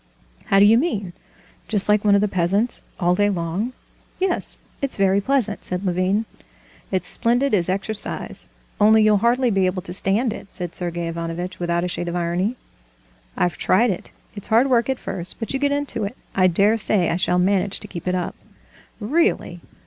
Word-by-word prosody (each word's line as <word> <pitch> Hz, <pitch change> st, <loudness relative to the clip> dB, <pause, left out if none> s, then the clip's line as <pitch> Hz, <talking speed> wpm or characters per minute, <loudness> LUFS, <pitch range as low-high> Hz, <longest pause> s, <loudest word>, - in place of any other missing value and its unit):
"How 195 Hz, -, +2 dB
do 200 Hz, -, +7 dB
you 225 Hz, +3 st, +6 dB
mean? 205 Hz, -, -2 dB, 0.5 s
Just 205 Hz, -3 st, +1 dB
like 210 Hz, 0 st, +3 dB
one 205 Hz, -1 st, +5 dB
of 200 Hz, -, +3 dB
the 210 Hz, -, +2 dB
peasants, 195 Hz, +5 st, 0 dB, 0.2 s
all 175 Hz, 0 st, +3 dB
day 205 Hz, +3 st, +2 dB
long?" 185 Hz, +5 st, -2 dB, 0.5 s
"Yes, 375 Hz, -1 st, -1 dB, 0.2 s
it's 275 Hz, -1 st, -1 dB
very 195 Hz, 0 st, +2 dB
pleasant," 230 Hz, -3 st, +1 dB
said 180 Hz, +2 st, -3 dB
Levin. 185 Hz, +4 st, +1 dB, 0.6 s
"It's 190 Hz, -1 st, -1 dB
splendid 245 Hz, +3 st, +1 dB
as 185 Hz, -3 st, +2 dB
exercise, 205 Hz, +3 st, -3 dB, 0.3 s
only 215 Hz, +1 st, +6 dB
you'll 215 Hz, -1 st, +5 dB
hardly 240 Hz, +2 st, +2 dB
be 195 Hz, -2 st, +2 dB
able 185 Hz, 0 st, -2 dB
to 175 Hz, -, -5 dB
stand 210 Hz, +5 st, +1 dB
it," 200 Hz, -, -9 dB
said 175 Hz, -2 st, -5 dB
Sergey 175 Hz, -1 st, -3 dB
Ivanovitch, 165 Hz, +2 st, -5 dB
without 170 Hz, 0 st, 0 dB
a -, -, 0 dB
shade 175 Hz, 0 st, -4 dB
of 170 Hz, -, -3 dB
irony. 175 Hz, +6 st, -1 dB, 0.8 s
"I've 175 Hz, -2 st, 0 dB
tried 230 Hz, +4 st, +3 dB
it. 180 Hz, -, -6 dB, 0.3 s
It's 205 Hz, -, -8 dB
hard 240 Hz, +5 st, +3 dB
work 235 Hz, 0 st, +3 dB
at 265 Hz, -, 0 dB
first, 180 Hz, -5 st, -6 dB
but 225 Hz, -, -4 dB
you 270 Hz, -, -1 dB
get 285 Hz, 0 st, +1 dB
into 285 Hz, -6 st, -2 dB
it. 205 Hz, +6 st, -6 dB, 0.2 s
I 185 Hz, -1 st, +4 dB
dare 200 Hz, +5 st, +3 dB
say 195 Hz, -4 st, +1 dB
I -, -, 0 dB
shall 180 Hz, 0 st, +1 dB
manage 190 Hz, +2 st, +1 dB
to 210 Hz, -, -8 dB
keep 175 Hz, -3 st, -8 dB
it 180 Hz, -, +1 dB
up...." 180 Hz, -2 st, -2 dB, 0.7 s
"Really! 320 Hz, -, 0 dB
200 Hz, 190 wpm, -22 LUFS, 180-225 Hz, 0.8 s, do